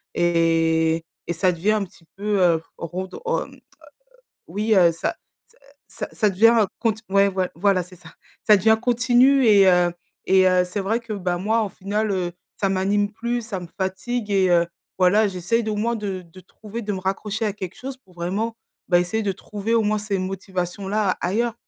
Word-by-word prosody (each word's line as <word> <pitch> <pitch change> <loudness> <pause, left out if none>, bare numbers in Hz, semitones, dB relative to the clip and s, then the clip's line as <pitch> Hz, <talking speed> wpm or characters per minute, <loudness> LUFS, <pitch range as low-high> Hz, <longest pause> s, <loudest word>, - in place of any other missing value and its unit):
et 165 -1 +2 0.2
et - - -1
ça 180 +2 +1
devient 175 +5 0
un 215 -2 +1
petit 170 -2 -21
peu 195 -5 +2 0.2
redon 185 - -6
hem, 470 - -2
heu, - - -20 0.9
oui, 215 +2 -2
heu, 175 -3 +6
ça 165 - -3 0.3
ça 485 +1 -28 0.3
ça - - -6
ça 215 -3 +1
devient 225 +3 +5
cont 225 -3 +1 0.2
ouais, 200 0 +4
voi 185 -1 -1
voilà, 190 +1 +2
c'est 180 +1 -14
ça. 165 -2 -15 0.4
Ça 210 - +7
devient 220 +3 +3
continu 250 +3 +4
et 200 -3 +6
heu 180 -1 +4 0.3
et 190 0 +5
heu, 180 0 +3
c'est 180 +3 -5
vrai 215 +5 0
que, 230 -2 -7
bah, 180 -3 -2
moi, 220 +5 +1
en 210 - -2
final, 205 +3 -2
heu, 180 -2 -1 0.3
ça 195 - +2
m'anime 200 +2 +1
plus, 235 +2 -3
ça 220 -4 -5
me 175 - -8
fatigue 205 +4 -3
et 190 -2 +3
heu, 170 -1 +3 0.3
voilà 195 +4 +4
j'essaye 195 +5 -1
d'au 215 -1 -2
moins 230 +3 0
de 195 -4 -4
de 170 +1 -17
trouver 215 +5 -9
de 210 -1 -3
me 190 - -4
raccrocher 210 +4 -2
à 210 - -1
quelque 190 -2 -7
chose 265 +1 -7
pour 195 -9 -25
vraiment, 200 +7 -3 0.3
bah, 175 -1 +4
essayer 210 +5 -2
de 195 - 0
trouver 210 +3 -4
au 230 - +3
moins 215 0 +1
ces 205 -2 -2
motivations-là 190 +1 -2
ailleurs. 225 +6 0
195 Hz, 195 wpm, -22 LUFS, 180-220 Hz, 0.9 s, Ça